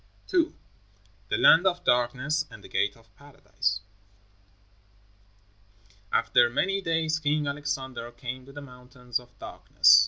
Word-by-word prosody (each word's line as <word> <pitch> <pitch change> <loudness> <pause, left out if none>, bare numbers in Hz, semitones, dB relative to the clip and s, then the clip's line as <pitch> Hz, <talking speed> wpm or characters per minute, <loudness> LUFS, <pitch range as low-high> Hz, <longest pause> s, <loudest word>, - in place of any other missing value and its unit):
II. 345 -2 +2 0.7
THE 390 - +1
LAND 190 - +6
OF 180 -1 0
DARKNESS 130 +5 +1
AND 100 - -13
THE - - -11
GATE 105 - 0
OF 115 -3 -25
PARADISE 105 -8 -3 2.3
After 120 -1 +4
many 195 +11 0
days 160 -2 0
King 150 0 0
Alexander 140 -4 -4
came 125 +2 -7
to - - -11
the 145 +1 -9
Mountains 125 -2 -6
of 125 0 -19
Darkness. 90 +5 +5
130 Hz, 125 wpm, -27 LUFS, 120-155 Hz, 2.3 s, LAND